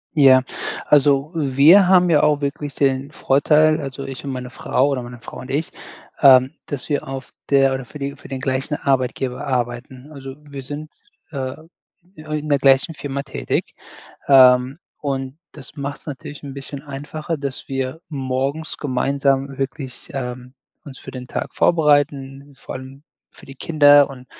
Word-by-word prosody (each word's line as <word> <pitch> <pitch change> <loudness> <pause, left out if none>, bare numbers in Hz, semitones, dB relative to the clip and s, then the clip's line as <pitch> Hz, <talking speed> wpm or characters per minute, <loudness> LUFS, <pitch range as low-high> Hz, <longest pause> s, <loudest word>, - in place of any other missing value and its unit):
Ja, 130 -3 +6 0.4
also, 145 +1 +3
wir 155 +6 +5
haben 180 -1 +5
ja 150 - +5
auch 150 -1 +3
wirklich 140 0 -4
den 135 0 +1
Vorteil, 155 +2 +3
also, 135 0 -6
ich 135 -1 -7
und 140 - -5
meine 125 -1 -6
Frau 135 +2 0
oder 130 -3 -1
meine 120 0 -9
Frau - - -10
und 130 - -10
ich, 150 +4 -2 0.5
ähm, 130 0 +7
dass 140 -4 -3
wir 145 -2 -2
auf 135 0 -7 0.2
der 135 -1 +4
oder 130 -1 -3
für 135 - -11
die 140 0 -4
für - - -14
den 135 - -5
gleichen 130 +3 -2
Arbeitgeber 130 0 -1
arbeiten. 125 +2 -3
Also, 135 -2 -9
wir 140 -2 -8
sind, 145 +3 -7 0.4
äh, 130 -3 -4 0.6
in 155 -1 -5
der 145 -2 +2
gleichen 135 +4 +4
Firma 140 -2 -5
tätig. 135 -2 -3 0.5
Ähm, 130 0 +6 0.2
und 135 0 -4
das 145 -2 -11
macht's 140 0 -6
natürlich 145 0 -8
'n 140 -2 -8
bisschen 140 0 -7
einfacher, 150 +3 -5
dass 140 -2 -5
wir 135 +3 -3
morgens 135 +2 -3
gemeinsam 135 0 0
wirklich, 135 -1 -5
ähm, 125 -1 -6 0.3
uns 135 -3 -10
für - - -10
den 125 -1 -8
Tag - - -5
vorbereiten, 145 -3 +1
vor - - -8
allem 135 +2 -11 0.3
für - - -17
die 135 0 -12
Kinder 145 -2 +5
und 130 -2 -11
140 Hz, 160 wpm, -20 LUFS, 130-145 Hz, 0.6 s, ähm